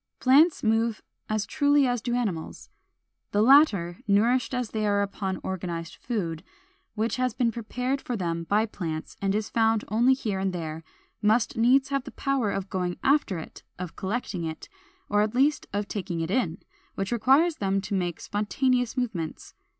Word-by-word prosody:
Plants 295 +6 +5
move 225 0 +1 0.3
as 215 -1 0
truly 285 -2 +3
as 245 -2 0
do 240 0 -1
animals. 200 -10 -3 0.6
The 205 +1 +4
latter, 220 - +5
nourished 230 +6 +3
as 250 -3 -2
they 215 -1 -1
are 200 0 +2
upon 195 -1 -3
organized 170 -3 -4
food, 175 -9 -3 0.5
which 225 +3 -1
has 255 -2 0
been 235 -2 +1
prepared 250 +4 -3
for 245 - -3
them 170 -3 -2
by 210 +5 +2
plants, 165 -7 -5
and 195 0 +1
is 215 0 -2
found 225 -1 +2
only 240 +5 +4
here 210 -7 -3
and 190 -1 -1
there, 160 -2 -5 0.4
must 220 +2 +2
needs 260 +4 +4
have 275 -2 -1
the - - -6
power 270 -6 0
of 195 -1 -3
going 180 -2 -2
after 275 - +2
it, 160 - -9 0.2
of 180 -2 -6
collecting 195 -3 -3
it, 160 -1 -5 0.4
or 205 - +2
at 215 +2 -1
least 275 +2 +2
of 205 +1 -2
taking 180 -5 -4
it 165 +2 -2
in; 190 -8 0 0.4
which 195 +2 -3
requires 270 +8 +3
them 195 -1 0
to 205 - -5
make 175 -3 -1
spontaneous 245 +4 0
movements. 200 -11 -3
215 Hz, 175 wpm, -26 LUFS, 190-250 Hz, 0.6 s, Plants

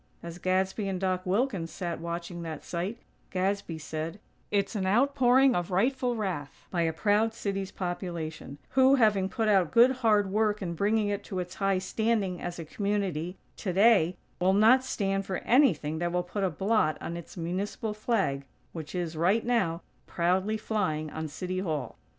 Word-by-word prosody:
As 170 +1 -7
Gadsby 190 +3 0
and 190 -2 -2
Doc 185 -1 -1
Wilkins 195 -4 0
sat 170 0 -4
watching 170 +1 -5
that 160 -2 -6
sight, 180 +7 -3 0.3
Gadsby 190 -2 -1
said: 160 +4 -5 0.3
"It's 200 0 0
an 190 -2 -1
outpouring 260 +3 +4
of 175 -2 -1
rightful 245 +6 +1
wrath 180 -10 -4
by 175 - 0
a 165 -1 +2
proud 210 +6 +1
city's 195 -3 -3
population; 170 -6 -5
who, 265 +1 +5
having 210 -6 +3
put 225 +1 -1
out 190 -6 +4
good, 240 +3 +6
hard 210 -5 +2
work 210 0 +1
in 175 -4 -3
bringing 205 +4 +1
it 205 0 -2
to 190 - -5
its 180 0 -4
high 195 -1 +1
standing 195 -1 -1
as 175 0 -4
a 165 - -6
community, 190 -2 -2 0.2
today, 190 -2 +3 0.2
will 185 +1 +3
not 225 +6 +6
stand 195 -5 -1
for 190 - -1
anything 170 - +3
that 175 0 -1
will 180 0 0
put 195 +3 -4
a 190 - +2
blot 190 -2 +1
on 170 - -5
its 170 +2 -9
municipal 195 +6 -3
flag, 195 - -1 0.3
which 160 +1 -7
is, 170 -2 -2
right 185 +8 +2
now, 190 -9 0 0.2
proudly 185 +5 +1
flying 155 -9 -2
on 160 0 -4
City 185 +5 -4
Hall." 155 - -3
190 Hz, 170 wpm, -28 LUFS, 170-215 Hz, 0.3 s, good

